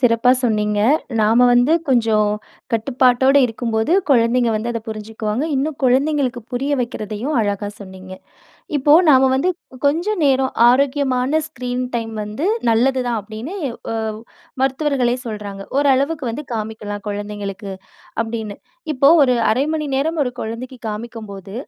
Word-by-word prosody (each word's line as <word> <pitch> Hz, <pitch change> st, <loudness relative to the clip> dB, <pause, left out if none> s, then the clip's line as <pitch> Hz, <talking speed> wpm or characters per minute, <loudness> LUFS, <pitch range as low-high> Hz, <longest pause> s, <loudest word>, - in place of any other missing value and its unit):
சிறப்பா 245 Hz, -1 st, +4 dB
சொன்னீங்க. 210 Hz, -3 st, +1 dB, 0.4 s
நாம 230 Hz, +4 st, +4 dB
வந்து 245 Hz, +6 st, +4 dB, 0.2 s
கொஞ்சம் 225 Hz, -4 st, +3 dB, 0.4 s
கட்டுப்பாட்டோட 255 Hz, +3 st, +3 dB
இருக்கும் 230 Hz, 0 st, -4 dB
போது, 220 Hz, +9 st, +1 dB, 0.2 s
குழந்தைங்க 235 Hz, -1 st, +3 dB
வந்து 225 Hz, +3 st, -2 dB
அதை 230 Hz, -, -3 dB
புரிஞ்சுக்குவாங்க. 220 Hz, +3 st, -3 dB
இன்னும் 285 Hz, +2 st, -1 dB
குழந்தைகளுக்கு 265 Hz, -1 st, +1 dB
புரிய 275 Hz, +4 st, -1 dB
வக்கிறதையும் 230 Hz, +4 st, -4 dB
அழகா 205 Hz, -1 st, -2 dB
சொன்னீங்க. 190 Hz, -1 st, -10 dB, 0.7 s
இப்போ 290 Hz, +3 st, +5 dB, 0.2 s
நாம 265 Hz, -1 st, +5 dB
வந்து, 310 Hz, +8 st, +1 dB, 0.4 s
"கொஞ்சம் 345 Hz, +6 st, 0 dB
நேரம் 265 Hz, -1 st, +2 dB, 0.2 s
ஆரோக்கியமான 270 Hz, +2 st, +2 dB
ஸ்க்ரீன் 250 Hz, -3 st, -4 dB
டைம் 225 Hz, -1 st, -3 dB
வந்து 215 Hz, -, -4 dB, 0.2 s
நல்லது 255 Hz, +3 st, +2 dB
தான்." 230 Hz, -2 st, 0 dB
அப்படீன்னு 220 Hz, -, -8 dB, 0.4 s
ஒ -, -, -3 dB, 0.7 s
மருத்துவர்களே 265 Hz, -2 st, +1 dB
சொல்றாங்க. 205 Hz, -3 st, -6 dB, 0.2 s
"ஓரளவுக்கு 280 Hz, +1 st, +2 dB
வந்து 295 Hz, +6 st, -6 dB
காமிக்கலாம் 215 Hz, -2 st, -5 dB
குழந்தைங்களுக்கு." 205 Hz, -1 st, -5 dB, 0.5 s
அப்படீன்னு. 225 Hz, -2 st, -5 dB, 0.4 s
இப்போ 275 Hz, +1 st, +3 dB
ஒரு 255 Hz, -2 st, +4 dB, 0.2 s
1/2 250 Hz, +5 st, +2 dB
மணி 305 Hz, -1 st, -2 dB
நேரம் 315 Hz, +4 st, -1 dB
1 250 Hz, -, -2 dB
குழந்தைக்கு 240 Hz, +3 st, -6 dB
காமிக்கும்போது, 210 Hz, -3 st, -8 dB
245 Hz, 125 wpm, -19 LUFS, 215-270 Hz, 0.7 s, இப்போ